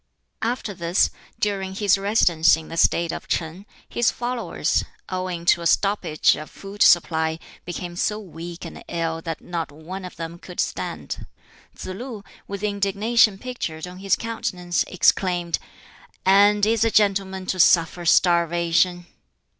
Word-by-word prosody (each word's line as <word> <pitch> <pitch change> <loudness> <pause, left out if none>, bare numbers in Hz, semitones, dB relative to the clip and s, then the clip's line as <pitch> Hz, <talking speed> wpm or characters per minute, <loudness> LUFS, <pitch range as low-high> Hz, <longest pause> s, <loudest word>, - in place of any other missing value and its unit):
After 230 -2 -2
this, 170 0 +1 0.3
during 195 -2 -2
his 205 -1 +3
residence 180 -6 +3
in 160 - -10
the 165 - -6
State 170 0 +2
of - - -7
Ch'in, 170 +5 -3 0.2
his 235 -1 +1
followers, 240 0 -1 0.3
owing 185 -2 -3
to 170 - +4
a 170 - +1
stoppage 195 -4 +2
of 155 - -8
food 200 +1 -10
supply, 160 -2 +4 0.3
became 175 0 -5
so 210 +4 -1
weak 170 -3 -8
and - - -9
ill 165 -1 -2
that 165 -1 -5
not 170 -4 -4
one 170 +6 -8
of 180 - -8
them 165 +1 -7
could 180 0 -11
stand. - - -3 0.5
Tsz - - -9
lu, 210 +3 -7 0.2
with 200 0 -6
indignation 205 +1 +2
pictured 195 -10 -5
on 180 +1 -10
his 195 0 +2
countenance, 180 -6 -2
exclaimed, 175 -2 +1 0.7
"And 205 +2 +5
is 225 0 +2
a 225 - +3
gentleman 195 -3 +1
to 185 - -2
suffer 170 0 +4
starvation?" 170 +1 +3
185 Hz, 145 wpm, -23 LUFS, 170-200 Hz, 0.7 s, And